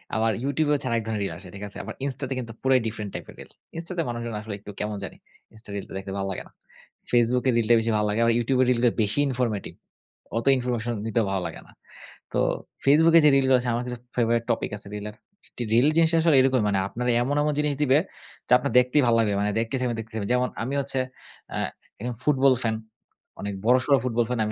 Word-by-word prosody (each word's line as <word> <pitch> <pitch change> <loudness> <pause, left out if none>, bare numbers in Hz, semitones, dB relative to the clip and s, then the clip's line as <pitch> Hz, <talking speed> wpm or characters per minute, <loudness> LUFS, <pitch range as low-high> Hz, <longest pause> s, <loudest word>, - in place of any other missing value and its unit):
আবার 110 0 +2
YouTube 145 +2 0
এ - - +3
হচ্ছে 140 -2 -1
আর 115 - +1
এক - - -6
ধরনের 110 -2 -2
রিল 95 - -4
আসে। 95 - -11
ঠিক 100 - -8
আছে? 100 - -9
আবার - - -6
Insta 135 0 0
তে - - -1
কিন্তু 115 -2 -6
পুরাই 130 -1 +4
ডিফারেন্ট 105 -2 -5
টাইপের - - -8
রিল। - - -12 0.3
Insta 165 +2 -4
তে 165 - +2
মানুষজন 120 -2 -4
আসলে 105 -1 -6
একটু 105 +1 -10
কেমন 105 0 -3
জানি। 90 - -7 0.4
Insta 110 -1 -13
রিলগুলা 100 -1 -6
দেখতে 95 0 -7
ভালো 95 - -2
লাগে - - -5
না। - - -23 0.6
Facebook 120 +1 +3
এ - - +5
রিলটা 115 +1 +3
বেশি 115 - 0
ভালো 105 - +1
লাগে। 105 - -1
আবার 115 - +4
YouTube 125 +2 +1
এ - - +2
রিলটা 120 0 +3
বেশি 105 +7 -1
ইনফরমেটিভ। 120 -5 -2 0.6
অত 115 - -2
ইনফরমেশন 120 -1 -2
নিতেও 115 0 +1
ভালো 95 - 0
লাগে - - -9
না। - - -18 0.6
তো - - +1 0.5
Facebook 160 +4 +5
এ - - +7
যে 150 - +8
রিলগুলো 130 -1 +4
আছে, 120 - -2
আমার 120 - -1
কাছে 125 - -4 0.2
ফেভারিট 115 -1 +2
টপিক - - -2
আছে 100 - -8
রিলের। 105 +1 -6 0.6
রিল 125 +5 +5
জিনিসটা 165 0 +4
আসলে 160 -4 +4
এরকমই। 130 -3 +2
মানে 95 -1 +1
আপনার 125 +4 -4 0.2
এমন, 145 +3 -1
এমন 150 - +1
জিনিস 150 -1 +1
দিবে 135 -1 +4 0.5
যে - - -14
আপনার 140 +2 -3
দেখতেই 125 +4 +3
ভালো 115 - +4
লাগবে। 105 -3 +2
মানে 105 0 +1
দেখতেই 115 +3 -1
থাকবেন, 120 -2 -1
দেখতেই 110 0 -8
থাকবেন। 100 -1 -3
যেমন 125 0 +1
আমি 135 +4 -3
হচ্ছে 135 -1 -2 0.6
আ - - -2 0.4
একজন 120 0 -3
ফুটবল 135 -2 +4
ফ্যান। 110 -1 0 0.7
অনেক 100 0 -3
বড়সড় 130 +3 +4
ফুটবল 120 -2 +1
ফ্যান। 125 -2 -2
আমি 105 - -2
120 Hz, 230 wpm, -25 LUFS, 110-130 Hz, 0.7 s, যে